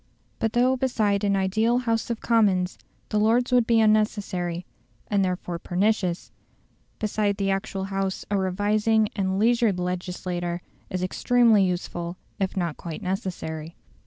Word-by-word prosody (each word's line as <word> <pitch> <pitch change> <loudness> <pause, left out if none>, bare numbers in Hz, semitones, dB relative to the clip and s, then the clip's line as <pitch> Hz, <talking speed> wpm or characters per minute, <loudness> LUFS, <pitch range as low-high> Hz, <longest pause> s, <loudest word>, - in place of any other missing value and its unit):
But 225 -1 0
though 250 +2 +3
beside 215 -6 +1
an 200 -1 +2
ideal 220 +5 +2
House 230 -2 -1
of 235 -1 -3
Commons 195 -6 +2 0.3
the 210 - +1
Lords 235 +4 +2
would 245 -2 +4
be 230 -1 +4
unnecessary, 205 -5 +1 0.5
and 200 -1 +3
therefore 180 -2 -2
pernicious, 185 -1 0 0.7
beside 210 -1 0
the 195 -1 0
actual 195 0 -2
House 195 0 -2
a - - +2
revising 210 +3 +2
and 190 -2 0
leisured 230 -2 +3
legislature 180 -1 -3 0.3
is 185 0 -2
extremely 230 +2 +4
useful, 175 -1 -3 0.2
if 195 0 -1
not 170 -4 -1
quite 165 -2 -7
necessary. 170 -4 -4
195 Hz, 135 wpm, -25 LUFS, 180-220 Hz, 0.7 s, would